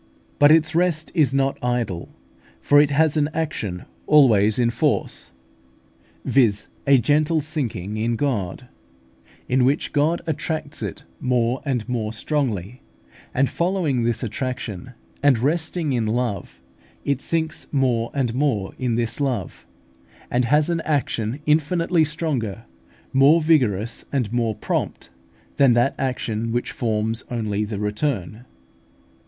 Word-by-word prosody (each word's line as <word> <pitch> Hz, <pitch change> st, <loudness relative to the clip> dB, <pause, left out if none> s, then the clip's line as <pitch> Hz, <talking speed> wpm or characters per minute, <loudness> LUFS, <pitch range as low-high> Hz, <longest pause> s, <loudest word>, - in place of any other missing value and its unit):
But 145 Hz, +1 st, +7 dB
its 155 Hz, 0 st, +4 dB
rest 165 Hz, -2 st, +1 dB
is 150 Hz, -7 st, +3 dB
not 135 Hz, -1 st, 0 dB
idle, 120 Hz, -8 st, -2 dB, 0.5 s
for 145 Hz, -, +5 dB
it 145 Hz, -, +2 dB
has 155 Hz, +1 st, +2 dB
an 145 Hz, -1 st, +2 dB
action 105 Hz, -, -3 dB, 0.2 s
always 110 Hz, -8 st, +5 dB
in 120 Hz, -1 st, +2 dB
force, 90 Hz, -, -1 dB, 0.9 s
viz., 115 Hz, -7 st, +2 dB, 0.2 s
a 140 Hz, -1 st, +7 dB
gentle 155 Hz, +5 st, +2 dB
sinking 125 Hz, -, -3 dB
in 115 Hz, +2 st, 0 dB
God, 120 Hz, -4 st, -2 dB, 0.8 s
in 130 Hz, 0 st, +2 dB
which 140 Hz, +4 st, +1 dB
God 155 Hz, +3 st, +2 dB
attracts 155 Hz, -1 st, -3 dB
it -, -, -5 dB, 0.2 s
more 125 Hz, 0 st, 0 dB
and 125 Hz, -6 st, -1 dB
more 115 Hz, -3 st, -2 dB
strongly; 120 Hz, -, -2 dB, 0.5 s
and, 135 Hz, +1 st, +2 dB
following 170 Hz, -7 st, 0 dB
this 115 Hz, +1 st, -1 dB
attraction, 125 Hz, -2 st, -4 dB, 0.3 s
and 140 Hz, -3 st, +4 dB
resting 160 Hz, +3 st, 0 dB
in 115 Hz, -3 st, 0 dB
love, 110 Hz, -4 st, -2 dB, 0.5 s
it 140 Hz, -1 st, 0 dB
sinks 160 Hz, 0 st, -2 dB
more 125 Hz, -5 st, +1 dB
and 130 Hz, -5 st, -1 dB
more 125 Hz, -8 st, 0 dB
in 125 Hz, -3 st, 0 dB
this 115 Hz, +4 st, -2 dB
love, 120 Hz, -, -3 dB, 0.6 s
and 125 Hz, 0 st, +2 dB
has 150 Hz, +5 st, +3 dB
an 165 Hz, -1 st, -1 dB
action 130 Hz, -4 st, -1 dB
infinitely 160 Hz, +3 st, +2 dB
stronger, 140 Hz, -, -2 dB, 0.5 s
more 140 Hz, +5 st, +6 dB
vigorous, 120 Hz, -, +1 dB
and 125 Hz, -6 st, -1 dB
more 115 Hz, -3 st, 0 dB
prompt, 105 Hz, -, -3 dB, 0.5 s
than 135 Hz, -3 st, +5 dB
that 120 Hz, +3 st, +2 dB
action 115 Hz, -4 st, -2 dB
which 120 Hz, +1 st, -1 dB
forms 110 Hz, 0 st, -1 dB
only 110 Hz, -3 st, -1 dB
the 105 Hz, -1 st, -4 dB
return. 105 Hz, -, -2 dB
130 Hz, 130 wpm, -22 LUFS, 115-150 Hz, 0.9 s, But